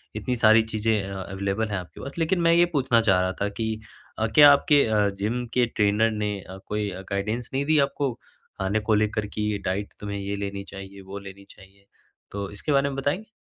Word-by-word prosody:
इतनी 115 +4 -2
सारी 110 -1 +6
चीज़ें 110 0 +1
अवेलेबल 100 +2 -2
हैं 100 - -2
आपके 90 -2 -9
पास। 140 +4 -8
लेकिन 170 +3 +1
मैं 165 0 +4
ये 170 +1 +6
पूछना 125 -5 +3
चाह 95 -5 +3
रहा 95 0 0
था 100 - +1
कि 110 +2 -3 0.5
अ, 110 - +1
क्या 145 -1 +10
आपके 145 0 +4
अ, 105 -2 +2
जिम 105 +5 -2
के 125 -1 +3
ट्रेनर 105 +2 +3
ने 105 -1 -2
अ, 95 +2 -10
कोई 105 -1 -2 0.2
गाइडेंस 110 +4 -2
नहीं 135 +1 0
दी 155 +1 +3
आपको 140 -2 -2 0.5
खाने 95 +3 0
को 110 +1 0
लेकर 105 0 0
कि 105 0 -2
डाइट 95 +2 -2
तुम्हें 100 -1 -4
ये 100 +1 -3
लेनी 100 0 -4
चाहिए, 95 0 -10
वो 95 +1 -8
लेनी 100 0 -11
चाहिए? 100 +1 -18 0.5
तो 100 -1 -4
इसके 105 +9 -4
बारे 140 0 +3
में 135 - -5
बताएँगे? 145 +10 -2
105 Hz, 205 wpm, -25 LUFS, 100-125 Hz, 0.5 s, क्या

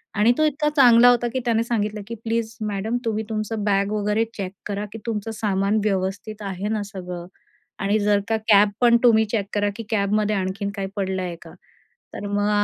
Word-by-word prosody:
आणि 215 +4 +4
तो 310 - +3
इतका 300 0 +1
चांगला 245 -2 +7
होता, 240 0 +3
की 260 - 0
त्याने 230 -1 +2
सांगितलं, 215 -3 -2
की 230 - -5
"प्लीज 225 -1 -2
मॅडम 210 +4 -2
तुम्ही 220 -1 -1
तुमचं 215 0 -3
बॅग 200 0 +1
वगैरे 210 +1 +1
चेक 195 -4 -5
करा, 205 0 -3
की - - -6
तुमचं 225 -1 -3
सामान 205 0 0
व्यवस्थित 200 +2 -2
आहे 195 0 -4
ना 215 -1 -1
सगळं 180 -4 -7 0.5
आणि 200 +2 +1
जर 205 0 +3
का 225 - +2
कॅब 205 -1 +6
पण 235 -1 +6
तुम्ही 220 -2 +5
चेक 210 -4 0
करा, 205 0 +1
की 230 - -6
कॅबमध्ये 210 0 +1
आणखीन 195 +1 -2
काही 195 -2 -3
पडलं 190 -1 -2
आहे 175 -1 -4
का?" - - -13 0.6
तर - - -6
मग 205 +1 0
210 Hz, 195 wpm, -23 LUFS, 200-225 Hz, 0.6 s, चांगला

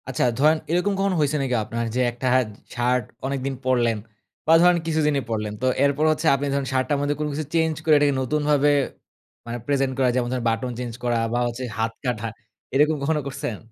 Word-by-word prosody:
আচ্ছা, 130 - 0
ধরেন 155 +4 +4
এরকম 180 +4 +1
কখন 195 -1 +1
হইসে 150 0 +1
নাকি 130 -2 0
আপনার 115 +2 -3
যে - - +1
একটা 120 +2 -7
হাত 130 -3 +3 0.3
শার্ট 125 +1 +1 0.2
অনেকদিন 135 0 -2
পড়লেন। 120 -3 +2 0.5
বা 160 - +5
ধরেন 180 0 +5
কিছুদিনই 150 -3 +1
পড়লেন। 105 -2 -2
তো - - 0 0.2
এরপর 140 +2 +2
হচ্ছে 155 +1 -1
আপনি 140 +1 -2
ধরুন 140 -1 -1
শার্টটার 130 +3 +1
মধ্যে 145 +1 0
কোনো 150 0 -1
কিছু 155 +2 -3
চেঞ্জ 160 -1 +2
করে 155 - +5
এটাকে 145 -1 +3
নতুনভাবে 145 +2 +2 0.8
আ - - -7 0.2
প্রেজেন্ট 135 -2 +1
করা, 130 -2 +3
যেমন 120 -1 0 0.2
বাটন 115 +2 -2
চেঞ্জ 120 -2 -4
করা 120 -1 +1 0.2
বা - - +1 0.4
হাত 115 0 +1
কাটা 115 -3 -1 0.5
এরকম 150 +3 +4
কখনো 155 +1 +1
করসেন? 120 -5 -4
135 Hz, 190 wpm, -23 LUFS, 125-150 Hz, 0.8 s, বা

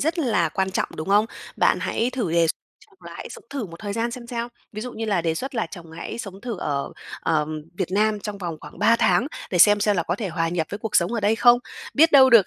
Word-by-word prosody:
rất 320 +5 0
là 215 - +2
quan 190 +4 -1
trọng, 190 - -1
đúng 155 - -5
không? 205 +2 +4 0.3
Bạn - - +3
hãy 235 +3 0
thử 235 -10 -2
đề 170 -1 +4
x - - +2 0.4
chung 400 -3 -27
là - - -8
hãy - - -7
sống - - -10
thử 270 -7 -3
một 165 -1 -11
thời 205 -1 -4
gian 230 +2 -1
xem 240 0 -8
sao. 235 0 -3 0.2
Ví 215 - -5
dụ 250 +2 -5
như 225 - -4
là 200 -6 +1
đề 165 -1 0
xuất 265 +10 -5
là 225 -6 0
chồng 175 -4 -9
hãy 195 +6 -6
sống 195 -4 -7
thử 235 -4 -5
ở, 140 -4 -2 0.3
ờm, 155 -1 0 0.2
Việt 185 -3 -1
Nam 210 +1 +2
trong 205 0 -5
vòng 170 -4 -4
khoảng - - -12
3 230 - +5
tháng 235 +1 +3 0.2
để 180 - 0
xem 205 +3 +7
xem 205 0 +2
là 170 - +2
có 175 - -1
thể 205 -2 -3
hòa 165 -1 -1
nhập 165 -2 -1
với 205 - -4
cuộc 210 -1 0
sống 175 +6 +2
ở 230 - -1
đây 210 +2 +2
không. 240 0 +6 0.4
Biết 325 +2 +5
đâu 265 -2 +8
được 225 -6 +7
205 Hz, 280 wpm, -24 LUFS, 175-235 Hz, 0.4 s, đâu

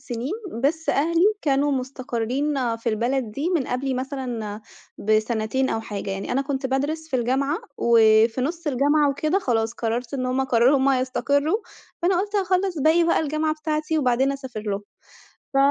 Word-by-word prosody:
سنين، 245 +7 -4 0.3
بس 320 +3 0
أهلي 335 +4 +2 0.2
كانوا 285 0 +2
مستقرّين 255 0 -2
في 230 +1 -3
البلد 235 +2 0
دي 295 +9 -2
من 270 - -1
قبلي 260 +1 -2
مثلًا 245 -5 -4 0.4
بسنتين 220 +4 +1
أو 225 - -1
حاجة. 205 -2 -5
يعني 195 0 -4
أنا 270 +2 +1
كنت 275 -1 -2
بادرس 295 +5 -2
في 260 - 0
الجامعة، 270 +6 0 0.2
وفي 225 +1 +4
نُص 330 +5 -3
الجامعة 290 +2 +3
وكده 310 +7 0
خلاص 225 - 0
قرّرت 235 +2 -3
إن 255 -2 -2
هم 255 +1 0
قرّروا 255 +2 +4
هم 270 +1 +3
يستقرّوا، 280 +6 +1 0.5
فأنا 360 0 +3
قُلت 410 +1 -5
أخلّص 375 -2 +1
باقي 330 +2 +5
بقى 335 - +2
الجامعة 310 +1 0
بتاعتي 310 0 -1
وبعدين 265 0 +2
أسافر 260 -5 -6
لهم. 205 -1 -3 0.7
ف - - +1
265 Hz, 160 wpm, -23 LUFS, 235-305 Hz, 0.7 s, باقي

